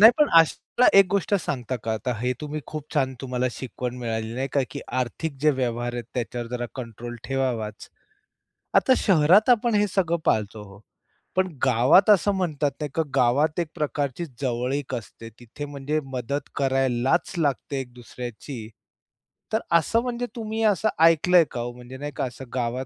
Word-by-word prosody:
नाही, 220 Hz, +3 st, +11 dB
पण 300 Hz, -, +5 dB
अशाला 200 Hz, +9 st, +1 dB
एक 195 Hz, -, +7 dB
गोष्ट 200 Hz, +1 st, +1 dB
सांगता 130 Hz, -, -2 dB
का 110 Hz, -, 0 dB
आता 110 Hz, +3 st, -2 dB
हे 125 Hz, +2 st, 0 dB
तुम्ही 150 Hz, 0 st, -4 dB
खूप 155 Hz, -2 st, -6 dB
छान 130 Hz, -2 st, +1 dB
तुम्हाला 130 Hz, -1 st, -1 dB
शिकवण 125 Hz, 0 st, -5 dB
मिळाली 110 Hz, -1 st, -3 dB
नाही 135 Hz, +2 st, -2 dB
का, 140 Hz, -, +3 dB
की -, -, -6 dB
आर्थिक 130 Hz, +4 st, -3 dB
जे 150 Hz, +1 st, +5 dB
व्यवहार 120 Hz, -3 st, -2 dB
आहेत 120 Hz, -1 st, -4 dB
त्याच्यावर 120 Hz, -1 st, -3 dB
जरा 120 Hz, -1 st, -3 dB
कंट्रोल 120 Hz, -1 st, -7 dB
ठेवावाच. 125 Hz, -6 st, -2 dB, 0.9 s
आता 260 Hz, -, +5 dB
शहरात 185 Hz, +4 st, +4 dB
आपण 235 Hz, -1 st, +3 dB
हे 205 Hz, 0 st, +3 dB
सगळं 170 Hz, -3 st, +1 dB
पाळतो 105 Hz, 0 st, 0 dB
हो, 100 Hz, +1 st, -14 dB, 0.6 s
पण 185 Hz, 0 st, +2 dB, 0.2 s
गावात 130 Hz, -, +5 dB
असं 205 Hz, 0 st, +5 dB
म्हणतात 155 Hz, -6 st, 0 dB
नाही 150 Hz, -, -3 dB
का, 160 Hz, -, +2 dB
गावात 145 Hz, +7 st, +2 dB
एक 170 Hz, -, 0 dB
प्रकारची 145 Hz, +1 st, -2 dB, 0.2 s
जवळीक 130 Hz, +2 st, -1 dB
असते, 115 Hz, 0 st, -9 dB
तिथे 120 Hz, +5 st, -8 dB
म्हणजे 145 Hz, +2 st, -2 dB
मदत 130 Hz, +3 st, -3 dB
करायलाच 135 Hz, +3 st, +1 dB
लागते 140 Hz, -2 st, -1 dB
एक 125 Hz, -2 st, -11 dB
दुसऱ्याची, 120 Hz, -1 st, -8 dB, 0.8 s
तर 220 Hz, -, +3 dB, 0.2 s
असं 225 Hz, +8 st, +1 dB
म्हणजे 245 Hz, 0 st, -3 dB
तुम्ही 220 Hz, -1 st, -3 dB
असं 215 Hz, 0 st, +3 dB, 0.2 s
ऐकलंय 165 Hz, +2 st, +5 dB
का 120 Hz, -, -4 dB
हो? 120 Hz, +1 st, -4 dB
म्हणजे 125 Hz, +1 st, -11 dB
नाही 145 Hz, +1 st, -5 dB
का -, -, -1 dB
असं 130 Hz, +1 st, -8 dB
गावात 125 Hz, +1 st, -2 dB
135 Hz, 170 wpm, -25 LUFS, 120-165 Hz, 0.9 s, नाही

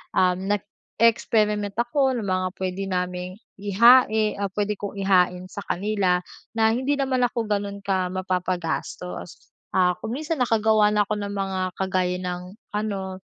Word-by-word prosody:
um, 180 Hz, -1 st, +3 dB
nag-e-experiment 210 Hz, 0 st, +1 dB
ako 260 Hz, +2 st, +2 dB
ng 235 Hz, -, -3 dB
mga 185 Hz, 0 st, 0 dB
puwede 190 Hz, +1 st, -3 dB
naming 180 Hz, 0 st, -3 dB, 0.2 s
ihain, 215 Hz, +1 st, +5 dB
ah, 200 Hz, -, 0 dB
puwede 210 Hz, +1 st, -1 dB
kong 205 Hz, 0 st, -5 dB
ihain 180 Hz, -2 st, +2 dB
sa -, -, -6 dB
kanila 190 Hz, -2 st, +1 dB, 0.4 s
na 220 Hz, 0 st, +4 dB
hindi 260 Hz, +5 st, 0 dB
naman 265 Hz, -2 st, 0 dB
ako 235 Hz, -1 st, -3 dB
gano'n 200 Hz, -1 st, -2 dB
ka 190 Hz, -2 st, 0 dB
mapapagastos. 180 Hz, -1 st, -3 dB, 0.2 s
Ah, 180 Hz, -1 st, +4 dB
kung 230 Hz, -, -4 dB
minsan 310 Hz, +1 st, -3 dB
nakagawa 220 Hz, -3 st, +3 dB
ako 210 Hz, 0 st, +2 dB
ng 200 Hz, 0 st, -4 dB
mga 195 Hz, -1 st, -2 dB, 0.2 s
kagaya 185 Hz, -1 st, 0 dB
ng 180 Hz, +1 st, -5 dB, 0.2 s
ano, 195 Hz, -3 st, -3 dB
200 Hz, 140 wpm, -24 LUFS, 185-220 Hz, 0.4 s, ihain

